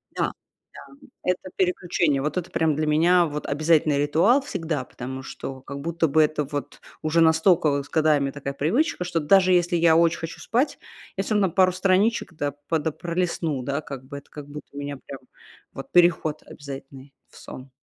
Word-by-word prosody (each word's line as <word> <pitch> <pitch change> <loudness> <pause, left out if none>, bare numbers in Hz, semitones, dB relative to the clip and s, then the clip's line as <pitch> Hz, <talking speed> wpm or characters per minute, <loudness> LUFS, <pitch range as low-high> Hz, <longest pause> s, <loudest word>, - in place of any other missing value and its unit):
Да, - - 0 0.4
да, - - -13 0.3
это 180 +1 -2
переключение. 175 -6 +1
Вот 150 +5 -2
это 180 -1 -3
прямо 160 -2 +1
для 155 +1 -1
меня 170 +4 +4
вот 150 -1 -5
обязательный 155 0 +2
ритуал 165 - +3
всегда, 165 - -3
потому 130 +1 -7
что 135 0 -7
как 140 +1 -8
будто 170 +2 0
бы 155 +2 +4
это 150 0 0
вот 145 0 -6 0.2
уже 160 +1 +2
настолько 160 -3 +3
с 145 - -16
годами 150 -3 +2
такая 140 0 -5
привычка, 180 - 0
что 175 -2 -1
даже 185 +4 +4
если 175 0 +2
я 165 -1 +4
очень 170 0 +3
хочу 165 0 -7
спать, 260 +5 -1 0.4
я 195 - 0
всё 215 - -1
равно 195 -4 +2
пару 185 +2 +4
страничек, 190 +2 +1
да, 145 -3 -3 0.2
пода 160 -1 0
пролистну, 170 -4 -2
да, 140 +3 -2
как 135 -3 -8
бы 140 +1 -8
это, 140 - -13
как 145 -2 -10
будто 150 +1 -9
у 140 - -11
меня 145 0 -5
прям 135 - -8 0.7
переход 170 -3 +3
обязательный 135 -1 -10 0.2
в - - -18
сон. 130 +1 -10
155 Hz, 180 wpm, -24 LUFS, 145-175 Hz, 0.7 s, меня